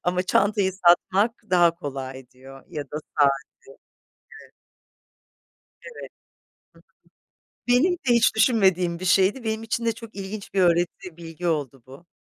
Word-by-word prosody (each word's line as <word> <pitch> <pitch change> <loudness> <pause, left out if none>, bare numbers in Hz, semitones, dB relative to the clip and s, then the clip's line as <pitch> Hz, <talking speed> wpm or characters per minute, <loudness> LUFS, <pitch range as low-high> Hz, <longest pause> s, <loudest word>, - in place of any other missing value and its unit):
ama 180 +1 0
çantayı 200 +1 +1
satmak 190 +4 +3 0.2
daha 175 -2 +4
kolay." 135 -5 -7
diyor 135 +1 -15
ya 150 -2 -6
da 145 - -8 0.2
saati. 140 -2 +5 1.1
Evet. - - -22 1.3
Evet. 470 -1 -10 1.4
Hı 245 - -4
hı. - - +6
Benim 355 +7 +2
de 355 - -4 0.2
hiç 235 -1 +3
düşünmediğim 190 -7 +2
bir 185 - -7
şeydi. 195 +6 +2
Benim 220 0 -2
için 230 +1 -3
de 230 - +1
çok 225 0 -13
ilginç 200 +1 -7
bir 195 - +2
öğreti, 175 -1 0
bilgi 170 +1 -8
oldu 140 -5 -3
bu. 135 +6 -15
180 Hz, 145 wpm, -24 LUFS, 160-215 Hz, 1.4 s, hı